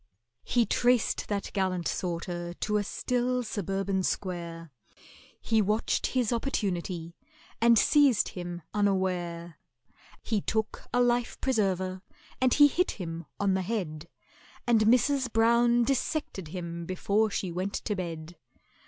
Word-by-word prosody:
He 240 -1 +2
traced 245 0 +2
that 200 -1 -3
gallant 185 -3 0
sorter 175 0 -3
to 210 +3 0
a 205 - 0
still 250 +4 -1
suburban 195 -2 -2
square; 170 -4 -4 0.7
He 220 -1 +2
watched 210 +3 0
his 250 -3 0
opportunity, 180 -8 -2 0.5
and 235 0 +6
seized 280 -3 +4
him 175 -1 -6
unaware; 180 -5 -1 0.6
He 215 -3 0
took 220 +2 -2
a 245 - +2
life 240 -1 +1
preserver 190 -7 0 0.4
and 255 -1 +4
he 290 - +7
hit 360 +5 +1
him 170 -3 -6
on 200 -1 +2
the 190 - +1
head, 175 -6 -3 0.6
And 235 -2 +4
MRS. 250 +3 +3
BROWN 235 +2 +4
dissected 265 - -2
him 170 0 -6
before 205 +4 +1
she 190 -2 -3
went 185 +3 -3
to 210 - -2
bed. 170 -2 -6
200 Hz, 125 wpm, -28 LUFS, 175-235 Hz, 0.7 s, he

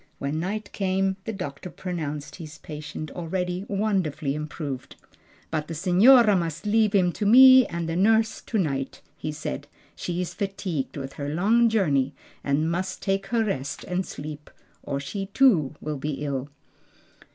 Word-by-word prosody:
When 140 +3 -2
night 200 +4 -3
came 190 0 0
the 225 - -2
doctor 180 -5 -6
pronounced 150 -6 -5
his 160 -1 -9
patient 150 0 -7
already 180 +2 -3
wonderfully 185 -9 0
improved. 145 -3 -5 0.6
"But 155 -1 -2
the 165 - -5
signora 205 - +6
must 170 -1 -2
leave 215 0 +3
him 180 -3 +4
to 205 - -4
me 260 +2 +9
and 170 -1 -4
the 165 - -2
nurse 220 +3 +3
to 225 - -3
night," 140 -8 -2
he 155 - -4
said; 150 - -5 0.3
"she 175 0 -3
is 180 - -3
fatigued 195 -9 -3
with 135 -1 -6
her 145 0 -4
long 220 +9 +3
journey 145 -11 +1 0.3
and 150 +4 +1
must 185 +2 -3
take 195 0 0
her 230 -1 +1
rest 140 -9 -3
and 180 0 -2
sleep, 150 -2 -8 0.3
or 140 -1 -3
she 195 +8 -5
too 175 - +4
will 150 -1 -4
be 150 +2 -3
ill." 140 -1 -3
175 Hz, 160 wpm, -25 LUFS, 150-195 Hz, 0.6 s, me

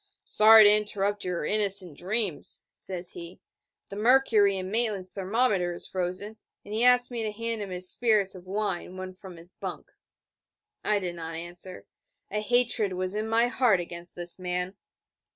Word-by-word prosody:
'Sorry 220 +1 +7
to 205 - +8
interrupt 205 -1 -1
your 180 -4 -3
innocent 195 -5 +1
dreams, 195 -1 -2
says 180 -2 -5
he: 170 +1 -10 0.5
'the 200 - -8
mercury 220 -4 +4
in 185 0 -5
Maitland's 210 -5 0
thermometer 195 -2 0
is - - -3
frozen, 185 +4 -4 0.3
and 205 - -8
he 225 +2 0
asked 250 0 +4
me 235 -2 -4
to 215 -1 -2
hand 230 +1 -4
him 200 - -5
his 180 0 -1
spirits 215 -3 +3
of 185 -1 -11
wine 195 -2 -3
one 185 0 -7
from 185 -1 -12
his 170 +2 -14
bunk...' - - -8 0.9
I 210 - +1
did 180 -3 -3
not 165 -1 -7
answer. 175 +2 -6 0.5
A 210 - -1
hatred 240 -3 +2
was 185 +1 -3
in 215 +1 -3
my 230 +1 +3
heart 245 -5 +2
against 170 0 -8
this 175 +1 0
man. 180 +1 -3
195 Hz, 170 wpm, -27 LUFS, 180-215 Hz, 0.9 s, to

